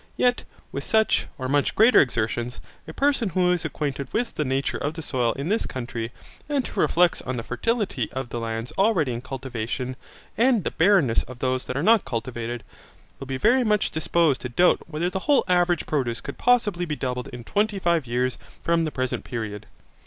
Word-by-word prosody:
Yet 245 0 +2 0.3
with - - -4
such, 220 -1 +2
or 130 -2 -3
much 145 +1 +1
greater 225 +4 +7
exertions, 120 -1 -1 0.3
a - - -6
person 275 - +1
who 180 +1 +2
is 175 -2 0
acquainted 145 -3 -3
with 240 +1 -1
the 150 - -1
nature 135 0 -1
of 145 +3 -2
the 160 - -6
soil 125 -5 0
in 140 +5 -4
this 220 +3 +1
country, 120 -2 -5 0.4
and 280 -4 0
who - - -2
reflects 175 0 +3
on 130 0 -4
the 115 - -3
fertility 195 - -1
of 130 -2 -4
the 120 - -4
lands 115 +1 -4
already 190 - +3
in 120 - -4
cultivation, 130 -1 -4 0.4
and 240 -4 +4
the - - -2
barrenness 165 - +4
of 130 - -9
those 130 0 -1
that 125 - -3
are 140 - -1
not 220 +2 +5
cultivated, 120 0 -4 0.6
will 135 - -7
be 135 0 -2
very 245 - +4
much 210 -2 +1
disposed 160 -2 +1
to 125 - -4
doubt 175 +9 +3
whether 165 +2 -1
the 190 - -2
whole 285 - +5
average 175 -1 +2
produce 125 -6 -1
could - - -8
possibly 210 -8 +2
be 155 -3 -3
doubled 125 -2 -3
in 120 -1 -8
twenty 205 - 0
five 170 -7 +1
years 125 +2 -1 0.2
from 165 -1 +2
the 155 - -2
present 130 -3 -2
period. 110 -4 -5
145 Hz, 195 wpm, -24 LUFS, 125-190 Hz, 0.6 s, greater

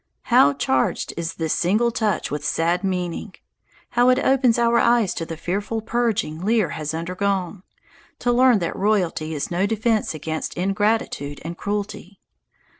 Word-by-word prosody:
How 140 +1 +6
charged 130 -2 0
is 165 0 -4
this 160 -2 -1
single 215 +7 +2
touch 220 -3 -1
with 145 0 -3
sad 170 +5 0
meaning! 185 +1 -3 0.5
How 245 +1 +3
it 255 - +4
opens 265 -3 +3
our 235 0 +3
eyes 235 -5 +3
to 165 - -5
the 165 - -6
fearful 205 +7 -2
purging 220 -8 -1
Lear 215 -3 +2
has 155 0 -4
undergone, 185 +2 -2 0.6
to 245 - 0
learn 250 -1 +5
that 170 -4 -3
royalty 180 -6 0
is 145 - -3
no 180 +3 +1
defence 220 -3 0
against 155 +1 -4
ingratitude 195 -6 -1
and 170 +1 -5
cruelty! 205 -1 -5
195 Hz, 150 wpm, -22 LUFS, 165-225 Hz, 0.6 s, How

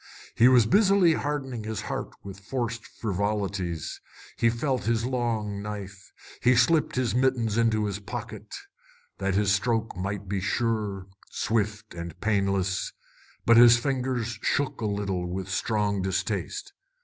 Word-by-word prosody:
He 120 - +6
was 125 -3 +6
busily 195 - +5
hardening 135 -6 -3
his 110 0 -4
heart - - -4
with 100 -1 -9
forced 115 +2 -3
frivolities. 100 -5 -2 0.3
He 115 - +3
felt 130 +2 -1
his 115 0 +1
long 115 -5 -1
knife. 100 -2 -7 0.3
He 125 +1 +5
slipped 155 +6 +3
his 125 -4 0
mittens 125 -4 +1
into 115 -2 +2
his 100 -1 -3
pocket 115 +1 -7 0.7
that 95 -1 0
his 100 0 +3
stroke 115 +2 0
might 100 +1 -4
be 95 0 -2
sure, 105 -2 -1 0.2
swift, 110 -1 -1
and 85 -1 -7
painless, 100 -3 0 0.5
but 115 0 +6
his 120 0 +9
fingers 125 -2 -2
shook 140 -4 0
a 110 - 0
little 100 -3 -2
with 95 +1 -4
strong 100 0 0
distaste. 110 - -2
110 Hz, 135 wpm, -27 LUFS, 100-120 Hz, 0.7 s, his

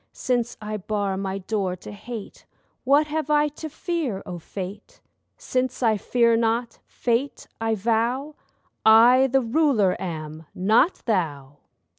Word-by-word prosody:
Since 240 -2 -1
I 215 0 -3
bar 200 -1 -2
my 190 0 -3
door 195 -1 -2
to 185 - -11
Hate, 220 +1 -9 0.4
What 285 +3 +4
have 305 -1 -3
I 300 0 +3
to 310 +2 -8
fear, 305 - -3
O 175 -1 -6
Fate? 190 +4 -8 0.4
Since 255 - -2
I 220 -2 +3
fear 235 +3 +2
not—Fate 235 +2 -1
I 225 0 +1
vow, 235 +7 0 0.5
I 240 +4 +7
the 270 +1 +2
ruler 230 -6 +2
am, 155 -2 -6
not 220 - +2
thou! 145 - -2
225 Hz, 130 wpm, -24 LUFS, 195-260 Hz, 0.5 s, I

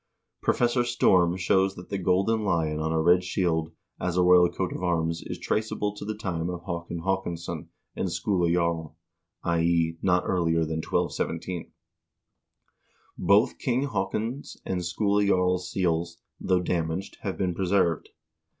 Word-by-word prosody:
1 - - -16
Professor 120 0 +2
Storm 90 -7 +3
shows 95 +1 +2
that 90 - -11
the 100 - -2
golden 95 +5 +2
lion 80 -6 0
on 80 +1 -1
a 80 - +1
red 90 +3 +4
shield 85 -3 0 0.3
as 90 0 -1
a 90 - +4
royal 90 -1 +6
coat 95 0 -3
of - - -6
arms 85 -2 0
is - - -4
traceable 105 -1 -1
to 105 - -8
the 110 +1 -3
time 90 -5 -2
of 90 -1 -5
Haakon 85 -1 -4
Haakonsson 95 -3 -3 0.3
and - - -1
Skule 90 -4 +1
Jarl 85 -3 0 0.5
(i.e. 85 -1 +1
not 90 -1 +2
earlier 85 -2 +1
than 80 0 -1
1217). 85 +2 -2 1.4
Both 105 +6 +3
King 130 +1 0
Haakon's 110 +5 -3
and 90 -1 -2
Skule 100 +4 +1
Jarl's 90 -2 +1
seals, 85 -2 -1 0.2
though 90 -1 +1
damaged, 85 +1 -2
have 95 -2 -3
been 90 -2 0
preserved. 90 -3 +1
90 Hz, 150 wpm, -27 LUFS, 85-95 Hz, 1.4 s, royal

